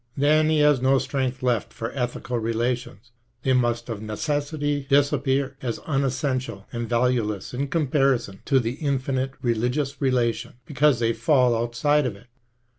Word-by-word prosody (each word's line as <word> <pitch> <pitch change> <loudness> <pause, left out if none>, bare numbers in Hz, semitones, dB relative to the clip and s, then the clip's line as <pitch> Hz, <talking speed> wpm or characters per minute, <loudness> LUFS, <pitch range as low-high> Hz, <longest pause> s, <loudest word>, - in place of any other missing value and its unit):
Then 155 +2 +4
he 155 -1 +3
has 150 -3 +4
no 135 +1 +4
strength 130 -1 -2
left 120 -4 0
for 115 +1 -5
ethical 125 -1 -3
relations, 120 +1 -2 0.3
they 130 - +2
must 120 -2 +1
of 110 -4 -5
necessity 145 +5 -2
disappear, 140 -1 +2
as 120 -3 -2
unessential 130 -6 -1
and 120 -1 -4
valueless 115 -4 0
in 140 +3 -2
comparison 135 - +1
to 135 -2 +3
the 120 +4 -3
infinite 135 -1 -1
religious 125 +5 -1
relation, 120 -3 0
because 150 -2 +3
they 115 0 +1
fall 130 -6 +3
outside 120 +5 +1
of 110 - -4
it. 100 +4 -17
130 Hz, 145 wpm, -24 LUFS, 120-140 Hz, 0.3 s, Then